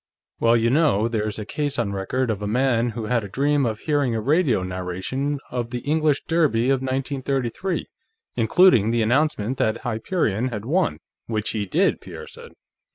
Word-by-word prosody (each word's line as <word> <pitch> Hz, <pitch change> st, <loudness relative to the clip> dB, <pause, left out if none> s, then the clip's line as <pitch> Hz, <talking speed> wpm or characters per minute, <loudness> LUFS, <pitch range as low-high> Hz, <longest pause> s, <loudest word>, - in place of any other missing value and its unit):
"Well, 115 Hz, 0 st, +4 dB
you 115 Hz, +1 st, +2 dB
know, 135 Hz, -8 st, +3 dB
there's 110 Hz, -2 st, -2 dB
a 105 Hz, -, -5 dB
case 145 Hz, +4 st, -2 dB
on 100 Hz, -4 st, -1 dB
record 115 Hz, +6 st, -1 dB
of 105 Hz, -2 st, -4 dB
a 105 Hz, -, -2 dB
man 120 Hz, +1 st, +1 dB
who 115 Hz, -1 st, -5 dB
had 120 Hz, 0 st, 0 dB
a -, -, -5 dB
dream 140 Hz, +3 st, +1 dB
of 110 Hz, -1 st, -4 dB
hearing 145 Hz, -6 st, +1 dB
a -, -, 0 dB
radio 135 Hz, -, +2 dB
narration 95 Hz, +11 st, -3 dB
of 120 Hz, -1 st, -3 dB
the 120 Hz, 0 st, -4 dB
English 155 Hz, -1 st, +1 dB
Derby 140 Hz, -7 st, +2 dB
of 135 Hz, -1 st, +1 dB
1933, 135 Hz, +5 st, -2 dB, 0.5 s
including 180 Hz, -, +4 dB
the 115 Hz, 0 st, +2 dB
announcement 130 Hz, -1 st, +1 dB
that 110 Hz, +1 st, 0 dB
Hyperion 120 Hz, -, -1 dB
had 110 Hz, -4 st, -5 dB
won, 160 Hz, -, +1 dB, 0.3 s
which 110 Hz, -1 st, -2 dB
he 105 Hz, -2 st, -3 dB
did," -, -, +1 dB
Pierre -, -, -9 dB
said. -, -, -12 dB
120 Hz, 175 wpm, -23 LUFS, 110-140 Hz, 0.5 s, Well